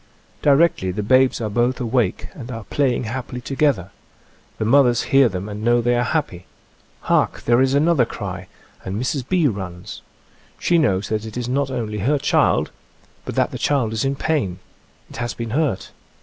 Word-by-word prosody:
Di - - +2
rectly 140 - +3
the 105 +3 -3
babes 130 +4 +3
are 110 - -1
both 120 +4 +1
awake 120 -5 0
and 125 -4 -9
are 115 -3 -6
play 130 +3 0
ing - - -3
happily 125 +2 -5
together. 130 - 0 0.7
The 110 - -2
mothers 125 0 +4
hear 135 -3 +6
them 95 0 -5
and 105 0 -6
know 120 +1 +3
they 120 +1 +1
are 120 - +2
happy. 125 - -2 0.5
Hark! - - +1
There 120 +2 +3
is 135 +1 +2
another 155 -2 +3
cry, - - -6 0.4
and 95 +2 -4
Mrs. 130 0 -2
B. 180 -4 +2
runs. 95 -7 -4 0.6
She 170 -1 +2
knows 100 -10 +1
that 110 -1 -1
it 110 +1 -7
is 120 -1 -3
not 140 +2 0
only 110 -5 -3
her 140 +9 +1
child, 145 +2 +2 0.5
but - - -5
that - - +1
the - - -6
child 130 -7 +1
is 110 - -1
in 135 0 0
pain. 135 - -1 0.5
It - - -11
has 120 0 -3
been 115 -2 -5
hurt. 145 -5 -1
120 Hz, 190 wpm, -21 LUFS, 110-140 Hz, 0.7 s, hear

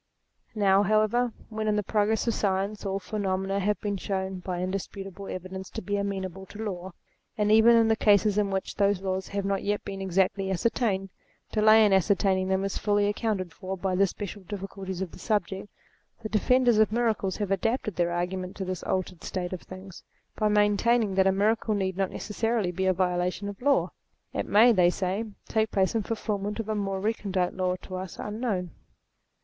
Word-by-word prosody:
Now, 195 -2 +4
however, 215 +4 +2 0.2
when, 215 -1 -3
in 210 - +2
the 210 - 0
progress 215 +3 +1
of 230 - +2
science, 200 +1 -1
all 195 0 -1
phenomena 195 0 -2
have 205 +2 0
been 205 -1 -2
shown, 190 0 -3
by 180 -1 -4
indisputable 195 +1 -5
evidence, 185 +1 -6
to - - -6
be 205 +2 -1
amenable 190 -2 -3
to 215 +1 -7
law, 185 -3 -5 0.4
and 210 0 +2
even 225 +2 +7
in 230 -1 +5
the 220 - +3
cases 210 -1 +4
in 205 -1 +1
which 190 -1 -2
those 200 -2 +3
laws 190 -1 -2
have 200 -1 -3
not 195 0 0
yet 205 0 -1
been 195 0 -5
exactly 190 +1 +1
ascertained, 195 0 0 0.4
delay 215 0 +6
in 205 - +3
ascertaining 190 0 +2
them 190 0 +1
is 195 - -2
fully 205 0 +2
accounted 205 -4 -1
for 190 +2 -5
by 185 +1 -1
the 195 +2 +4
special 205 +2 -6
difficulties 190 -1 -5
of 185 - -7
the - - -12
subject; 200 -2 -1 0.5
the 215 - -4
defenders 240 +1 +3
of 215 -1 +4
miracles 220 -5 0
have 205 -2 -2
adapted 215 +1 0
their 175 -1 +1
argument 180 +2 -3
to 190 - -4
this 185 -1 -4
altered 185 -2 -3
state 180 -1 -3
of 185 - -5
things, 185 0 -11 0.3
by 215 - +1
maintaining 210 +1 +3
that 190 0 +3
a - - +5
miracle 215 +2 +1
need 190 -2 -1
not 190 -1 0
necessarily 225 -3 -1
be 190 +2 -1
a - - +5
violation 180 +2 -1
of 205 +1 -7
law. 280 +2 +2 0.4
It - - -2
may, 225 +4 +6
they 180 -5 +5
say, 190 +4 -1 0.2
take 220 0 +1
place 190 -2 +1
in 225 - +1
fulfilment 210 -1 -3
of 220 -1 -4
a - - +1
more 195 -2 -2
recondite 195 -3 -1
law, 185 -1 0
to 185 - -6
us 185 -1 -7
unknown. 210 -5 -3
195 Hz, 190 wpm, -27 LUFS, 190-215 Hz, 0.5 s, even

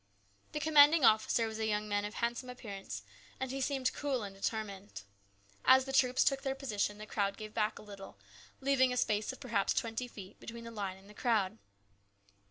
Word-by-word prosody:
The 300 - -1
commanding 300 -1 +6
officer 220 +1 +4
was 220 0 -5
a 220 - 0
young 210 0 0
man 205 0 0
of 210 - -6
handsome 240 +2 -2
appearance, 195 - -7 0.4
and 260 -1 -3
he 270 0 -3
seemed 265 -1 0
cool 270 -5 -1
and 200 -1 -6
determined. 200 - -4 0.6
As 260 0 +6
the 270 - -5
troops 255 -1 +4
took 275 -1 +2
their 270 -1 -2
position 210 -6 -2
the 215 - -8
crowd 200 -2 -1
gave 215 -1 -8
back 215 -1 0
a - - -10
little, 200 - -11 0.4
leaving 265 -1 +3
a 250 - -2
space 215 -2 +1
of 260 - -11
perhaps 230 -7 0
twenty 230 +2 -2
feet 195 -5 -11
between 230 0 -8
the 230 - -8
line 200 -4 -4
and 190 +1 -18
the 210 - -13
crowd. 215 -2 0
225 Hz, 195 wpm, -33 LUFS, 205-260 Hz, 0.6 s, commanding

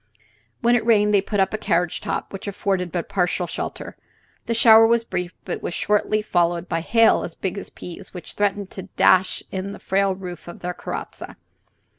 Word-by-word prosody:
When 240 +1 +4
it 230 - +1
rained 210 -2 +3
they 200 - +5
put 205 +1 -2
up 190 - +2
the 215 - -3
carriage 175 -4 0
top, - - -4
which 195 - -7
afforded 190 -3 -1
but 175 0 -3
partial 180 -1 0
shelter. - - -6 0.5
The 230 - 0
shower 225 -1 +7
was 235 0 +2
brief, 180 -5 -4
but - - -4
was 175 - -4
shortly 210 +1 +1
followed 175 -2 +1
by 165 -1 -1
hail 225 +6 +4
as 165 - -7
big 190 0 -3
as - - -9
peas, 180 +2 -10
which 180 - -9
threatened 205 -1 -1
to 195 0 -9
dash 185 0 +4
in 195 +1 -4
the - - -10
frail 195 0 +1
roof 180 -2 -8
of 175 - -10
their 180 0 -3
carrozza. - - -7
195 Hz, 195 wpm, -22 LUFS, 180-210 Hz, 0.5 s, shower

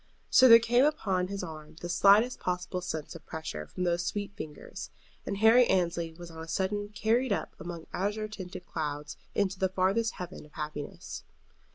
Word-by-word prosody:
So 255 - +8
there 230 - +12
came 240 +2 +3
upon 195 -12 +1
his 195 0 -4
arm 155 -2 -8
the 175 - -5
slightest 205 +8 +5
possible 180 0 -2
sense 160 -4 -4
of 165 - -11
pressure 75 - -5
from 180 - -4
those 175 -1 +1
sweet 205 +3 -3
fingers, 150 - -8 0.4
and 200 - -2
Harry 225 +3 +6
Annesley 170 -3 +1
was 170 +1 -11
on 160 0 -9
a 165 - -8
sudden 205 +4 -1
carried 230 +5 +1
up - - -1
among 170 0 -7
azure 210 +3 -1
tinted 185 -3 -8
clouds 150 -2 -4 0.2
into 195 -2 0
the 190 - +2
farthest 195 +5 +1
heaven 180 0 -7
of 150 0 -18
happiness. 150 -1 -6
185 Hz, 180 wpm, -30 LUFS, 165-210 Hz, 0.4 s, there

